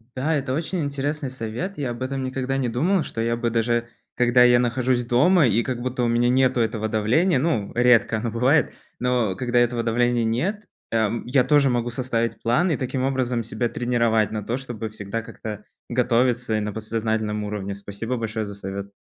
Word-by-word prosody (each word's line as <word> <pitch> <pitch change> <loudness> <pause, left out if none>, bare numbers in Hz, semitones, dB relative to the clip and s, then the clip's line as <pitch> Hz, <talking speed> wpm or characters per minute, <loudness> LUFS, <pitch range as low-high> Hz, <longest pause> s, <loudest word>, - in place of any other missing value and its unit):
Да, 150 +5 0
это 135 -3 -2
очень 165 +5 -2
интересный 145 0 -2
совет. 130 - -5
Я 135 -4 -2
об 120 +1 -8
этом 135 0 -3
никогда 130 +1 -2
не 130 -2 0
думал, 160 +10 +1
что 115 - -4
я 115 +1 0
бы, 120 0 0
даже 120 +1 0 0.3
когда 125 0 +4
я 120 0 +6
нахожусь 125 0 +1
дома, 145 +6 +4
и 115 +1 +2
как 125 -1 -3
будто 125 0 -2
у - - +2
меня 120 +1 +2
нету 130 0 +3
этого 110 -1 -1
давления, 125 - +2
ну, 125 -9 0
редко 120 -2 +4
оно 115 +2 -2
бывает, 125 +6 +2 0.3
но 120 -6 +1
когда 120 -1 -1
этого 120 -1 +1
давления 120 0 +1
нет, 185 - -1 0.3
эм, 115 0 0
я 125 0 +3
тоже 145 -2 +4
могу 120 -1 0
составить 120 -2 -2
план 155 +10 +2
и 150 - +1
таким 130 0 -2
образом 130 -3 0
себя 115 +1 -2
тренировать 115 -3 +1
на 110 -1 -3
то, 120 +3 -1
чтобы 120 -4 -6
всегда 105 +1 -5
как-то 105 -2 -8 0.2
готовиться 125 -1 +1
и - - 0
на 105 -1 -3
подсознательном 110 -1 -2
уровне. 100 -1 -4
Спасибо 100 +5 -5
большое 110 -1 -3
за 100 - -7
совет. 100 0 -6
120 Hz, 190 wpm, -23 LUFS, 115-130 Hz, 0.3 s, я